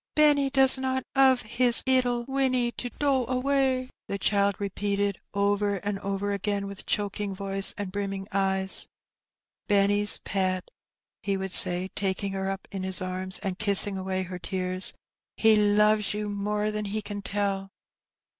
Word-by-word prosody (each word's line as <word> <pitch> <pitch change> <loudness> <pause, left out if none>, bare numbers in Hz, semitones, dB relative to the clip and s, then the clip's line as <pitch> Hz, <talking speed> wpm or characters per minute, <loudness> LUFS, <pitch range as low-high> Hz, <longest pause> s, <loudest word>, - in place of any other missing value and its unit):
"Benny 290 -2 +3
does 270 -1 +6
not 260 0 -2
^ove 265 -2 +4
his 235 +2 +3
'ittle 250 -2 +2
Winnie, 260 -3 0
to 245 - -6
do 270 0 0
away," 260 0 -1 0.2
the 200 - -4
child 200 0 +1
repeated 200 0 -2 0.2
over 200 0 0
and 200 +1 -4
over 200 +1 -3
again, 200 0 -3
with 200 -1 -9
choking 205 -1 -2
voice 195 0 0
and 200 -2 -5
brimming 195 -1 -5
eyes. 190 -1 +4 0.8
"Benny's 205 0 +5
pet,'' 185 -1 -3 0.5
he 195 -1 -2
would 190 0 -5
say, 180 +1 +2
taking 195 0 -2
her 195 0 -3
up 195 0 -6
in 195 - -5
his 190 0 +1
arms 185 0 -4
and 190 -1 -4
kissing 200 -1 +4
away 190 0 -3
her 180 0 -8
tears; 185 +1 -1 0.4
"he 220 -1 +5
loves 210 0 +2
you 210 0 -4
more 210 +1 -2
than 210 0 -4
he 210 +1 -4
can 205 -1 -7
tell." 195 -1 -3
205 Hz, 155 wpm, -26 LUFS, 195-220 Hz, 0.8 s, does